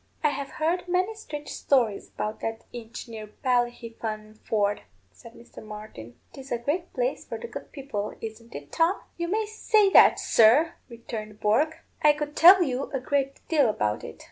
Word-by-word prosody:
"I 300 - +4
have 280 -1 -5
heard 340 +3 -1
many 370 +4 +1
strange 300 -9 -8
stories 235 -7 0
about 215 +1 -4
that 225 0 -4
inch 235 0 -8
near 220 -2 -8 0.2
Ballyhefaan 230 -4 -2
ford," 205 -2 0 0.3
said 230 - -15
Mr. 235 - -13
Martin. 210 - -10 0.2
"'Tis 270 0 -11
a 240 - +1
great 300 +9 -2
place - - -2
for - - -6
the - - -8
good - - -9
people, 260 -8 -5
isn't 225 +1 -9
it, 145 0 -9
Tom?" 335 +4 +2 0.2
"You 340 0 -2
may 430 +4 0
say 430 -1 +2
that, - - +7
sir," 270 +10 +5 0.2
returned 220 -3 -8
Bourke. 300 +10 +1 0.2
"I 300 -1 +6
could 295 0 -5
tell 360 +3 +8
you 270 -3 -2
a 270 - -1
great 275 +1 -2
deal 290 -7 +3
about 105 - -1
it. - - -9
255 Hz, 175 wpm, -26 LUFS, 220-320 Hz, 0.3 s, tell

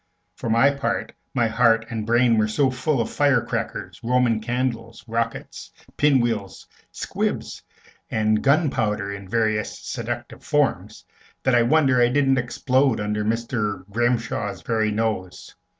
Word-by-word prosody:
For 115 +5 -5
my 115 +5 +5
part, 140 0 -2 0.2
my 120 -2 +3
heart 115 0 +3
and 110 -2 -4
brain 120 -1 +4
were 110 - +2
so 130 +5 +1
full 130 +2 -1
of 115 - -3
fire 140 -3 +3
crackers, - - -4
Roman 120 -2 +2
candles, 115 -1 -3
rockets, 115 0 -4 0.3
pin 145 -3 +4
wheels, 110 -5 -3 0.3
squibs, - - -3 0.5
and 110 -1 +1
gunpowder 120 -9 +1
in 100 -1 -9
various 110 -1 0
seductive - - -6
forms, - - -1 0.4
that 130 - +2
I 120 - +5
wonder 130 0 +3
I 120 - +5
didn't 135 0 +2
explode 130 +1 +1
under 105 0 -1
Mr. 105 -3 -2
Grimshaw's 115 -4 -1
very 110 -2 0
nose. 105 -4 -3
115 Hz, 135 wpm, -23 LUFS, 110-125 Hz, 0.5 s, my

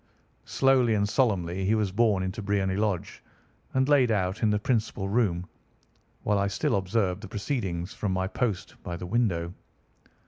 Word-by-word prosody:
Slowly 130 -4 +3
and 100 0 +1
solemnly 95 -7 +1
he 105 +4 +2
was 105 -3 0
borne 105 -2 +2
into 95 +4 -4
Briony 100 -2 0
Lodge 100 -4 -2 0.5
and 130 0 +2
laid 140 -4 +4
out 95 -3 0
in 110 - +3
the 105 - +2
principal 105 -3 -1
room, 100 -5 +1 0.8
while 105 -1 +2
I 100 - +1
still 100 - 0
observed 95 0 0
the 110 - -7
proceedings 100 - -3
from 105 - -2
my 95 0 0
post 95 -1 -2
by 85 -1 -5
the 90 - -6
window. 90 -5 0
100 Hz, 165 wpm, -27 LUFS, 95-115 Hz, 0.8 s, laid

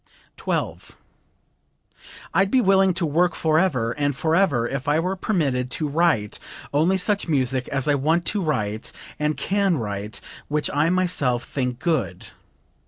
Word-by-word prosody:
12. - - -3 1.4
"I'd 195 0 +3
be 260 - +3
willing 195 -3 +4
to 185 -2 0
work 170 +4 +2
forever 155 -8 +1
and 145 +1 -1
forever 160 -5 +2
if 135 +2 -4
I 150 +2 +3
were 180 +3 -1
permitted 140 -11 0
to 150 +4 -2
write 145 -9 +1 0.3
only 165 +6 +3
such 200 +1 0
music 130 -4 0
as 140 -2 -1
I 145 - +4
want 160 +5 +1
to 210 - -1
write 110 - -2 0.3
and 150 0 0
can 195 -3 +1
write 105 -2 -4 0.3
which 150 0 -1
I 150 +3 +2
myself 170 -10 +1
think 125 -3 -3
good. 135 - -2
150 Hz, 145 wpm, -23 LUFS, 130-180 Hz, 1.4 s, willing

